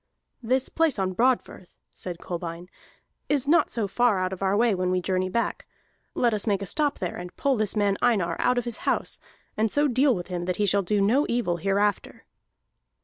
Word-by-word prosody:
"This 255 +2 +1
place 325 -6 +1
on 190 -1 -1
Broadfirth," 235 -5 0 0.2
said 180 -2 -6
Kolbein, 170 0 -6 0.6
"is 285 -2 +1
not 330 +4 +4
so 225 -4 -2
far 225 +1 +2
out 185 0 -1
of 190 - -8
our 195 +1 +1
way 230 -1 +3
when 185 -1 -1
we 185 0 +1
journey 185 0 -1
back. 235 +5 -2 0.5
Let 240 -2 +2
us 210 +1 -1
make 200 -2 +1
a - - -4
stop 290 - 0
there, 180 -3 -4
and 180 0 -9
pull 280 -2 +1
this 215 -2 -1
man 200 -2 +1
Einar 195 -9 +2
out 250 - +2
of 245 - 0
his 235 -2 -3
house, - - -1 0.4
and 220 +1 +1
so 290 +1 +3
deal 260 +1 +3
with 175 -2 -5
him 175 -1 -4
that 180 0 -1
he 210 - +1
shall 200 +1 +3
do 205 +2 0
no 240 +9 +3
evil 235 -8 0
hereafter." 200 +3 -1
205 Hz, 205 wpm, -25 LUFS, 185-245 Hz, 0.6 s, not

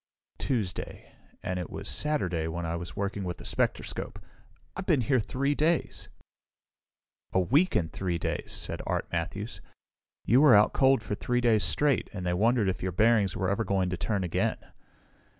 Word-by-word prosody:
"Tuesday 110 -9 -3 0.3
and 90 0 -2
it 90 - -5
was - - -6
Saturday 90 - 0
when 85 +1 -4
I 85 0 -2
was 85 0 -6
working 100 0 -2
with 90 -2 -4
the - - -12
spectroscope. - - -2 0.6
I've 185 0 -6
been 155 -8 +3
here 130 +2 +2
three 135 +6 0
days!" 160 +3 0 1.2
"A - - +4
week 145 - +3
and 80 -2 0
three 90 -3 -2
days," - - -3
said - - -3
Art - - -1
Matthews. 100 +6 -4 0.6
"You 125 +4 +5
were 145 -7 +8
out 105 +1 +5
cold 135 -4 +4
for 105 - -4
three 125 +4 0
days 115 -5 +3
straight, 135 - +1
and 95 -3 -5
they 90 - +1
wondered 110 +3 +2
if 95 - -1
your 95 - -2
bearings 105 -1 +3
were 95 +1 0
ever 100 +3 0
going 95 -3 0
to 90 - -2
turn 95 +3 -1
again." 85 - 0
100 Hz, 175 wpm, -28 LUFS, 90-125 Hz, 1.2 s, were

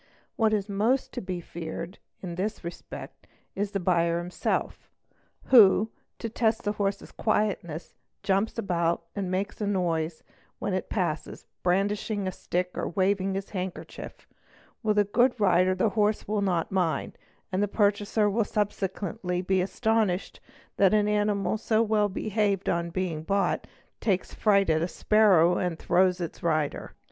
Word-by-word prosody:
What 220 -2 +3
is 210 -2 0
most 220 +6 +1
to - - -4
be 185 -2 -4
feared 165 +2 -7 0.2
in 175 -2 -4
this 195 +5 -3
respect 170 +1 -9 0.3
is 205 +1 -2
the 200 - -2
buyer 170 -2 +2
himsel 175 +1 -1 0.7
who, 220 -2 +6 0.3
to - - -4
test 225 0 0
the 205 - 0
horse's 200 -1 -2
quietness, 195 -7 -1 0.3
jumps 200 +4 +1
about 170 -5 0
and 195 -3 -2
makes 195 +4 -2
a 205 - 0
noise 170 -5 -1 0.3
whem - - -2
it - - -2
passes, - - -2 0.2
brandishing 200 +3 0
his 185 - -3
stick 180 +1 -2
or - - -2
waving 190 +2 +1
his 195 0 -5
handkerchief; 185 -2 -6 0.5
with 215 -2 +1
a 205 - +5
o0C 245 +4 +2
rider 185 -2 +4
the 185 +4 +2
horse 210 +1 +1
will 210 0 0
not 180 -4 0
mind, 175 -6 0 0.4
and 185 +1 0
the 205 - +2
purchaser 205 +1 +2
will 215 +3 +2
subsequently 195 -3 -2
I 190 - +1
astonished 200 -1 0 0.4
that 200 +1 +5
an 210 -1 +3
animal, 210 -1 +1
so 220 0 +2
well 210 -2 +2
behaved 200 -1 -1
on 170 0 0
being 170 -3 -2
bought, 195 +4 0 0.3
takes 195 -4 -1
frig 200 -5 +3
at 160 0 +2
a 170 - +1
sparrow 185 -4 +4
and 175 -3 -1
throws 180 +1 +2
its 170 -2 -5
rider. 155 -3 -1
195 Hz, 155 wpm, -27 LUFS, 180-210 Hz, 0.7 s, who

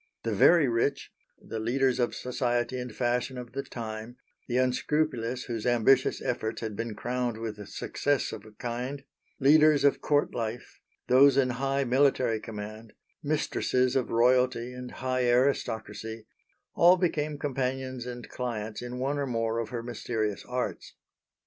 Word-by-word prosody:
The - - -1
very 170 -5 +6
rich, 120 +4 0 0.3
the 115 - -6
leaders 130 +3 +1
of 120 - 0
society 125 0 -1
and 125 -1 -5
fashion 125 +3 -1
of 120 -2 -7
the 135 +3 -3
time, 115 -2 -7 0.3
the 125 - 0
unscrupulous 130 -1 0
whose 115 -1 -4
ambitious 125 +2 +3
efforts 110 -2 -2
had 110 -2 -4
been 115 0 -4
crowned 120 -1 -2
with 105 -3 -6
success 145 +4 -1
of - - -7
a 110 - -14
kind, 125 +5 -4 0.4
leaders 150 +1 +5
of 140 - +3
Court 145 -1 +1
life, 115 0 -5 0.3
those 135 +2 +6
in 130 -2 +3
high 135 +2 0
military 130 -3 +2
command, 110 0 -8 0.3
mistresses 130 -4 0
of 130 - +1
royalty 125 +1 +2
and 125 0 -7
high 130 -1 -1
aristocracy 115 -3 0 0.5
all 175 +2 +6
became 155 -4 -1
companions 130 -2 -3
and 120 -1 -7
clients 110 -4 -4
in 125 0 -6
one 140 +3 -1
or 140 - -1
more 115 -2 -1
of 115 -2 -3
her 115 -1 -4
mysterious 110 -3 -3
arts. 125 0 -4
125 Hz, 150 wpm, -28 LUFS, 115-135 Hz, 0.5 s, very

